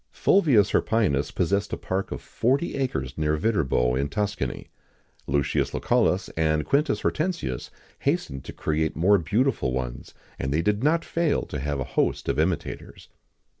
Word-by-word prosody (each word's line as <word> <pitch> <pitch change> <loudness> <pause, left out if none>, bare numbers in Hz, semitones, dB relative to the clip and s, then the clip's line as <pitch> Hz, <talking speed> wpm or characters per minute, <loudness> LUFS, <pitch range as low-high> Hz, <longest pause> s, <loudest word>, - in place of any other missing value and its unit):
Fulvius 140 - +3
Hirpinus 95 -12 +1
possessed 100 +3 0
a - - -1
park 95 +1 -3
of - - -5
forty 135 +8 0
acres 70 - -2
near 75 0 +1
Viterbo, 70 - +1
in 70 +3 0
Tuscany. 100 - -3 0.6
Lucius 70 0 0
Lucullus, 95 +1 +2
and 80 -1 0
Quintus 145 +1 +1
Hortensius 155 - -2 0.3
hastened 65 -1 -1
to - - -6
create 80 0 -1
more 100 +5 +4
beautiful 105 - 0
ones, 60 -1 -5 0.2
and 65 - -2
they 80 +3 +1
did 105 +4 +1
not 165 +3 +2
fail 165 -3 0
to 75 - -5
have 70 +1 -2
a - - 0
host - - 0
of - - 0
imitators. - - -3
85 Hz, 150 wpm, -25 LUFS, 70-115 Hz, 0.6 s, more